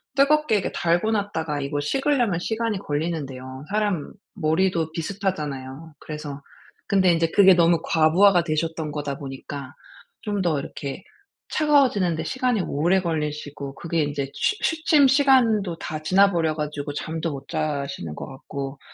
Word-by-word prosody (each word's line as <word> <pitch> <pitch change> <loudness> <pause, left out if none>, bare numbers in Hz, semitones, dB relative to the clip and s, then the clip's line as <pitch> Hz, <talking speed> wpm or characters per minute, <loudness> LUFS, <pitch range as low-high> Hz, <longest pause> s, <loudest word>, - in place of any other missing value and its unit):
뜨겁게 280 -4 +4
이게 - - -3
달궈 175 +6 +1
놨다가 165 -8 -2
이거 145 +1 -2
식으려면 240 - +1
시간이 220 0 -2
걸리는데요. 145 -5 -4
사람 205 -7 -1 0.2
머리도 165 -1 +1
비슷하잖아요. 155 -5 -4
그래서 150 -2 -7 0.5
근데 185 -3 +4
인제 165 0 +1
그게 190 -2 +7
너무 170 -1 +4
과부하가 175 +3 +4
되셨던 160 -1 -2
거다 145 -2 -4
보니까 140 0 -7 0.5
좀 205 -3 -2
더 160 -5 +1
이렇게 140 +4 -6 0.5
차가워지는 265 - +3
데 - - -3
시간이 250 -5 0
오래 175 +5 +1
걸리시고 150 -4 -4
그게 165 +1 -1
인제 140 -1 -3
취 420 - 0
취침 315 -3 +3
시간도 240 - +3
다 155 0 -5
지나버려 175 -3 +3
가지고 150 -1 -4
잠도 160 +2 -3
못 135 -1 -8
주무시는 155 -2 -1
자시는 80 - -6
것 - - -7
같고 135 +1 -7
165 Hz, 345 characters per minute, -24 LUFS, 145-200 Hz, 0.5 s, 그게